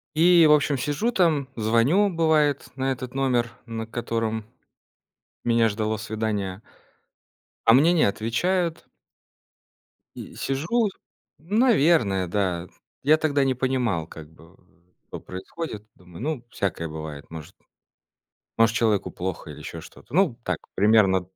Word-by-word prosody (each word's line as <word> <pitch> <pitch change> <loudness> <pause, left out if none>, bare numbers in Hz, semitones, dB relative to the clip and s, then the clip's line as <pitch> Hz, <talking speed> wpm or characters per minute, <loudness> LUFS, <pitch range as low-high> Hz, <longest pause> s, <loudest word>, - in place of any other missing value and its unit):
И, 170 0 +6
в 150 - +6
общем, 145 -1 +3
сижу 145 - -1
там, 160 - +2
звоню, 115 - +3
бывает, 155 -4 +2
на 135 0 -1
этот 130 -1 -5
номер, 125 -3 +1 0.2
на 115 -1 -5
котором 115 -2 -3 1.0
Меня 115 -1 +3
ждало 110 +1 -2
свидание. 105 -2 -3 1.0
А 115 - +7
мне 160 +7 +5
не 165 - +3
отвечают. 165 - 0 1.3
И - - -9
сижу 170 - 0 0.5
наверное, 165 - +2
да. 90 -2 -1 0.4
Я 155 +3 +5
тогда 145 -3 +1
не 130 - +1
понимал, 125 -10 -1
как 80 -2 -11
бы, 85 +2 -19 0.5
что - - -7
происходит. 105 - -7
Думаю: 90 0 -13
"Ну, 140 -4 -3
всякое 95 -7 -3
бывает, 75 -1 -8
может". 80 -2 -10 1.0
Может, 115 0 +4
человеку 110 -4 +1
плохо 90 0 -5
или - - -9
ещё - - -8
что-то. - - -15
Ну, 165 -9 +2
так 90 -3 -2 0.2
примерно 100 -3 +4
115 Hz, 125 wpm, -24 LUFS, 100-150 Hz, 1.3 s, А